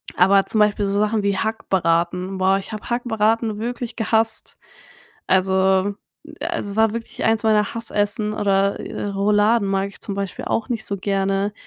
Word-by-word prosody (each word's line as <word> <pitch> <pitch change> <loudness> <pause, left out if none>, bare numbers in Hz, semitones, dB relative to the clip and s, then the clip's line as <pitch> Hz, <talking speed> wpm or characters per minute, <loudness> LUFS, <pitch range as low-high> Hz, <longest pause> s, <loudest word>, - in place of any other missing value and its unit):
Aber 195 +2 +4
zum 220 - -1
Beispiel 210 -1 +3
so 200 +1 0
Sachen 215 0 +1
wie 200 -1 +1
Hackbraten. 180 -3 0
Boah, 190 +1 +3
ich 195 - -7
habe 215 -1 -7
Hackbraten 225 -2 0
wirklich 240 0 -4
gehasst. 220 0 0 0.7
Also 190 +1 +2 0.5
also, 270 -13 -3
war 220 0 +3
wirklich 230 +1 -6
eins 225 0 +2
meiner 215 0 +2
Hassessen 210 -1 -1
oder, 200 -1 +1
äh, - - -5
Rouladen 205 +2 +2
mag 195 0 0
ich 200 - -15
zum 200 - -4
Beispiel 195 -1 -4
auch 225 - -1
nicht 230 -3 -2
so 200 - -2
gerne. 195 +1 0
205 Hz, 160 wpm, -21 LUFS, 195-220 Hz, 0.7 s, Aber